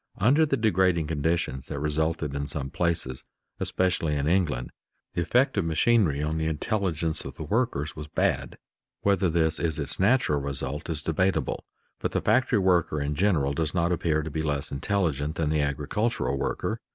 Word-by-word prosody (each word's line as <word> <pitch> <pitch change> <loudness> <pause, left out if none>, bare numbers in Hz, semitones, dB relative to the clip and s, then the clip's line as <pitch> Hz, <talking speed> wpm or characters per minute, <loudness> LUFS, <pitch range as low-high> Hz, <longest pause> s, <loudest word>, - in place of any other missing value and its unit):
Under 140 +10 +4
the 135 - +1
degrading 95 -7 +2
conditions 75 -3 -1
that - - -5
resulted 75 0 -1
in 70 0 -3
some 70 -1 -4
places, 85 -7 -1 0.4
especially 90 -4 0
in 70 -1 -1
England, 75 -8 +1 0.4
the - - 0
effect 130 +9 +2
of - - +1
machinery 80 -2 +2
on 80 +1 -1
the 80 - 0
intelligence 80 -1 -1
of - - -8
the - - -6
workers 80 - -1
was 75 -1 -7
bad. - - -1 0.4
Whether 100 -2 +2
this 80 -1 +1
is 80 -3 0
its 75 0 -2
natural 95 - +3
result 70 +3 -3
is 75 -2 -1
debatable, 95 +4 0 0.4
but - - -2
the - - +1
factory 125 -2 +3
worker 90 -5 +2
in 70 +1 -1
general 75 -5 +2
does 80 +2 -1
not 85 0 +2
appear 80 -3 +1
to 80 - -5
be 80 - -2
less 75 -2 -2
intelligent 75 -2 -1
than 75 -2 0
the 75 -1 +2
agricultural 70 - -1
worker. 70 - -2
80 Hz, 175 wpm, -27 LUFS, 75-95 Hz, 0.4 s, Under